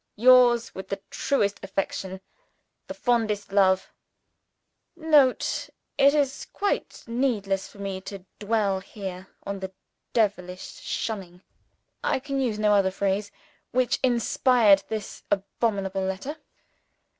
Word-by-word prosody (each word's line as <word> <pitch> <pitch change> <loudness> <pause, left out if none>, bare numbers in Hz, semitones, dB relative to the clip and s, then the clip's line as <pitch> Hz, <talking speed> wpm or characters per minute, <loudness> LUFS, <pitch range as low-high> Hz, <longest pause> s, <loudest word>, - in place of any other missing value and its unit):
Yours 240 0 +5
with 190 - -7
the 195 - -3
truest 205 -8 0
affection, 190 -1 -3 0.7
the - - -5
fondest 220 -5 0
love, 190 -1 +3 1.0
"OSCAR." 320 -2 -8
[Note. 275 -4 +4 0.3
It 280 +1 +6
is 280 -3 0
quite 405 -1 -2
needless 225 -6 -1
for - - -17
me 195 -1 -4
to 195 -1 -9
dwell 205 -2 +1
here 190 -2 -8 0.2
on 200 0 -4
the 190 0 -5 0.4
devilish 185 -5 -2
cunning 185 -5 -6 0.6
I - - +2
can 275 0 -2
use 235 -5 0
no 210 -1 +3
other 195 -2 +4
phrase 200 +1 -1 0.4
which 255 0 +1
inspired 240 -4 +4
this 215 -2 -5
abominable 195 -1 -1
letter. 190 +11 -3
205 Hz, 120 wpm, -26 LUFS, 195-245 Hz, 1.0 s, It